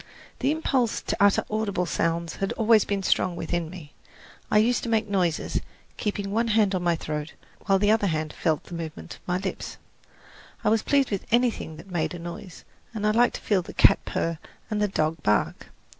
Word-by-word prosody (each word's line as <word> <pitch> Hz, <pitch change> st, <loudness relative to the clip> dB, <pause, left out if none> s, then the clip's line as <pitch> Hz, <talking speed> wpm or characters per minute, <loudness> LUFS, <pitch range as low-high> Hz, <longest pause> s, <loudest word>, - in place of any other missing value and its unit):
The 265 Hz, -, +1 dB
impulse 270 Hz, -7 st, +1 dB
to -, -, -2 dB
utter 200 Hz, 0 st, +4 dB
audible 210 Hz, -4 st, -1 dB
sounds 165 Hz, -1 st, -1 dB
had 195 Hz, -, -1 dB
always 225 Hz, -1 st, +4 dB
been 200 Hz, -1 st, -1 dB
strong 185 Hz, -1 st, +2 dB
within 170 Hz, -1 st, -2 dB
me. 165 Hz, -5 st, -11 dB, 0.6 s
I -, -, +3 dB
used 235 Hz, +3 st, +3 dB
to 235 Hz, -, -4 dB
make 220 Hz, -1 st, +1 dB
noises, 180 Hz, -5 st, 0 dB, 0.3 s
keeping 205 Hz, -1 st, -3 dB
one 230 Hz, +3 st, +1 dB
hand 210 Hz, -3 st, +3 dB
on 185 Hz, -, 0 dB
my 175 Hz, -1 st, +2 dB
throat 150 Hz, -1 st, -4 dB, 0.3 s
while 195 Hz, -, +5 dB
the 205 Hz, +2 st, +3 dB
other 220 Hz, -2 st, +3 dB
hand 155 Hz, -3 st, -2 dB
felt 160 Hz, -3 st, 0 dB
the -, -, -12 dB
movements 165 Hz, -2 st, -6 dB
of -, -, -30 dB
my 180 Hz, 0 st, +1 dB
lips. 190 Hz, 0 st, -5 dB, 0.9 s
I -, -, +3 dB
was 220 Hz, 0 st, +3 dB
pleased 275 Hz, -1 st, +2 dB
with 200 Hz, -, -3 dB
anything 235 Hz, -9 st, +1 dB
that 185 Hz, +4 st, -12 dB
made 175 Hz, 0 st, -1 dB
a -, -, -5 dB
noise 175 Hz, +2 st, -8 dB, 0.3 s
and 210 Hz, -, -3 dB
liked 240 Hz, +1 st, +4 dB
to -, -, -6 dB
feel 200 Hz, -4 st, +2 dB
the -, -, -11 dB
cat -, -, +5 dB
purr 165 Hz, -1 st, -2 dB, 0.3 s
and 210 Hz, -1 st, 0 dB
the 210 Hz, -, +3 dB
dog 155 Hz, -4 st, -1 dB
bark. 105 Hz, 0 st, 0 dB
195 Hz, 200 wpm, -26 LUFS, 170-215 Hz, 0.9 s, while